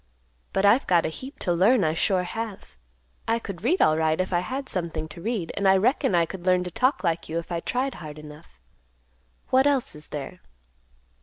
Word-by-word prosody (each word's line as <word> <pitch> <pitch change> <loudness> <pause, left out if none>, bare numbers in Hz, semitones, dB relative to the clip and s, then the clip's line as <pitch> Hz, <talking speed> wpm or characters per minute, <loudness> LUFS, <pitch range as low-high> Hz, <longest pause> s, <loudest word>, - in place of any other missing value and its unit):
But 195 - +1
I've 230 +6 +4
got 175 -2 +3
a - - 0
heap 260 - -9
to 175 - +1
learn, 200 +6 +4
I 155 -1 +1
sure 180 +2 +1
have. 200 - -6 0.5
I 225 +1 +2
could 200 -5 -8
read 330 +11 +3
alright, 155 +1 +2
if 185 0 -1
I 175 - +3
had 265 +9 -4
something 165 -3 -2
to 170 +3 -10
read, 210 -5 -2
and 200 - +1
I 190 0 +6
reckon 245 +1 +2
I 170 -1 +4
could 180 +1 -8
learn 180 0 +4
to 180 - -6
talk 255 +8 +1
like 165 0 -1
you 165 - -2
if 170 +1 -5
I 170 - -1
tried 255 +8 -2
hard 155 -3 -9
enough. 150 - -13 0.9
What 265 +2 +5
else 275 -4 +1
is 150 0 -10
there?" 150 +5 -7
180 Hz, 210 wpm, -25 LUFS, 165-230 Hz, 0.9 s, I